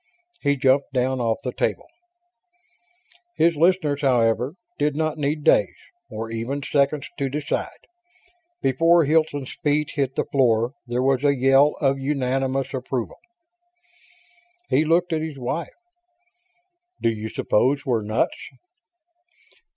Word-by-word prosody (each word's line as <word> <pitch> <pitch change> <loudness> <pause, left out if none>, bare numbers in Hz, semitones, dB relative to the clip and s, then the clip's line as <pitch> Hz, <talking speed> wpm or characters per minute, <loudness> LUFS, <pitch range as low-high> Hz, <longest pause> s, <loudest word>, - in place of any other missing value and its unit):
He 145 -1 +2
jumped 135 0 +2
down 130 0 0
off 115 -2 -1
the 125 - -3
table. - - -2 1.5
His 165 0 +3
listeners, 155 -3 +2
however, 125 +1 +1 0.2
did 145 0 +1
not 155 0 -1
need 150 +1 -1
days, - - +3 0.3
or 115 +1 -6
even 120 +5 -3
seconds, 140 0 0
to 135 -1 0
decide. 150 +2 -4 0.8
Before 165 +5 +4
Hilton's 150 -3 0
feet 150 0 +1
hit 135 -3 -2
the - - 0
floor 120 -2 +2
there 120 +1 -1
was 135 0 +1
a 140 -1 +3
yell 135 +3 +4
of 135 -1 +1
unanimous 135 -1 -1
approval. 130 -2 -4 1.5
He 155 - +4
looked 170 +2 +2
at 155 - 0
his 155 -3 -5
wife. 130 +6 -3 1.3
"Do - - +2
you 110 0 -5
suppose 135 +9 +1
we're 120 -5 +1
nuts?" 110 +3 -2
135 Hz, 125 wpm, -23 LUFS, 125-150 Hz, 1.5 s, Before